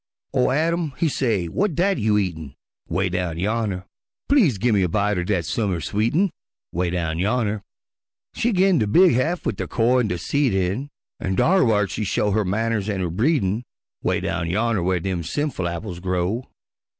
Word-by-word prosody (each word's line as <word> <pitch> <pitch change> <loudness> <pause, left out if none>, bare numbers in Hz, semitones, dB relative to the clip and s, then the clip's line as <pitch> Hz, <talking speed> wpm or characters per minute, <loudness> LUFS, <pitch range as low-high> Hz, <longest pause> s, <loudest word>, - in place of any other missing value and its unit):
Ol' 125 - +3
Adam 160 +1 0
he 165 - +1
say, 115 - 0
"W'at 180 - -1
dat 190 0 +2
you 105 -1 +2
eatin'?" 80 -8 -3 0.3
('Way 95 0 +1
down 90 -2 -2
yonner) 100 -1 -1 0.4
"Please 210 - +4
gimme 105 -1 +2
a 90 - +1
bite 105 +1 +1
er - - -1
dat 90 -3 0
summer 95 -1 -1
sweetin'," 115 - +1 0.4
('Way 90 +1 -1
down 85 -2 -2
yonner) 105 +1 0 0.7
She 240 - 0
gin 190 -4 +3
de 105 - +1
big 175 - +5
haff 155 +9 0
wid - - -1
de - - -3
core 125 +2 +2
an' 120 - +1
de 90 - -2
seed 130 - 0
in, 95 +9 -1 0.3
An' 95 0 -2
dar 190 - +4
whar 105 -4 +2
she 105 - -3
show 105 +1 0
her 110 +2 +2
manners 110 +2 -1
an' 100 -2 -1
her 90 -3 -1
breedin', 110 - +1 0.4
'Way - - 0
down 85 -1 -2
yonner 110 +2 +1
whar 90 +1 +1
dem 90 0 -2
sinful 95 - -2
apples 85 +1 -5
grow. 90 +6 -1
105 Hz, 185 wpm, -23 LUFS, 90-130 Hz, 0.7 s, big